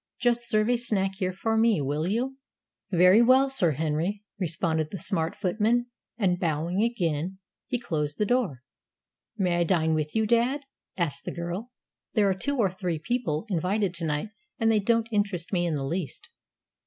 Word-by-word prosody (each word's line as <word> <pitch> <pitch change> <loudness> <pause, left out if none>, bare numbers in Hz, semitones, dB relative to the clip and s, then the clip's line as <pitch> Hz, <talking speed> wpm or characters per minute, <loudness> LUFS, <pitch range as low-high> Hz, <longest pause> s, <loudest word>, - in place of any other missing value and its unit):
Just 240 -1 +1
serve 215 0 +3
a 245 0 +3
snack 205 -5 0
here 185 -2 0
for 225 +4 -1
me, 225 -3 +4
will 145 +4 -1
you?" 255 +7 -1 0.5
"Very 185 +4 +6
well, 260 +3 +5
Sir 175 - +2
Henry," 160 +8 -1 0.2
responded 160 -3 -1
the 195 - -5
smart 165 -4 -2
footman; 220 +5 +1 0.3
and, 180 -5 +1
bowing 170 +3 0
again, 185 -6 -1 0.3
he 250 - 0
closed 150 -10 -2
the 210 - +1
door. 205 - 0 0.7
"May 180 -4 +1
I 175 - +3
dine 160 -2 +2
with 155 +2 -2
you, 220 0 +3
dad?" 240 +6 +2 0.4
asked 170 -6 -2
the - - -3
girl. 175 +7 -4 0.5
"There 210 -3 +4
are 195 - +3
two 280 +9 -2
or 200 -6 +2
three 180 -3 -2
people 190 -3 -2
invited 190 +1 0
to 170 -2 -4
night, 150 +7 -1 0.3
and 225 -1 +3
they 215 - +4
don't 230 +2 +2
interest 200 -5 -1
me 175 -1 +2
in 160 - 0
the 140 - -2
least." 165 +1 -4
190 Hz, 180 wpm, -27 LUFS, 165-225 Hz, 0.7 s, Very